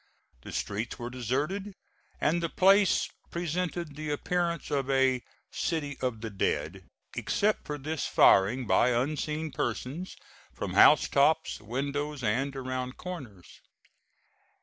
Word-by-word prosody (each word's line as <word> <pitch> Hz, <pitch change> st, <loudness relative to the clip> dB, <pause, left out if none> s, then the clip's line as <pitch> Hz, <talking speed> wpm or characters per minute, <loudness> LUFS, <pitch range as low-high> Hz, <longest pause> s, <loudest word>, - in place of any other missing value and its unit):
The -, -, -9 dB
streets 105 Hz, +3 st, -3 dB
were 120 Hz, 0 st, -6 dB
deserted, 145 Hz, -, -2 dB, 0.4 s
and 170 Hz, +3 st, +1 dB
the 165 Hz, -, -1 dB
place 195 Hz, +2 st, +4 dB, 0.2 s
presented 170 Hz, -2 st, -3 dB
the 155 Hz, 0 st, -5 dB
appearance 170 Hz, +2 st, -1 dB
of 140 Hz, -2 st, 0 dB
a 130 Hz, -2 st, +3 dB, 0.3 s
"city 150 Hz, -5 st, -2 dB
of 125 Hz, -4 st, -2 dB
the 115 Hz, -1 st, -5 dB
dead," 95 Hz, -1 st, -2 dB, 0.3 s
except 210 Hz, +1 st, 0 dB
for 150 Hz, -, -3 dB
this 155 Hz, +1 st, -3 dB
firing 115 Hz, +7 st, +5 dB
by -, -, +4 dB
unseen 155 Hz, +3 st, -2 dB
persons 135 Hz, +10 st, -3 dB, 0.4 s
from -, -, -4 dB
house -, -, +7 dB
tops, -, -, +2 dB
windows, 140 Hz, +5 st, -3 dB
and 130 Hz, +6 st, 0 dB
around 130 Hz, -1 st, -4 dB
corners. 120 Hz, -, -9 dB
140 Hz, 125 wpm, -29 LUFS, 125-165 Hz, 0.4 s, house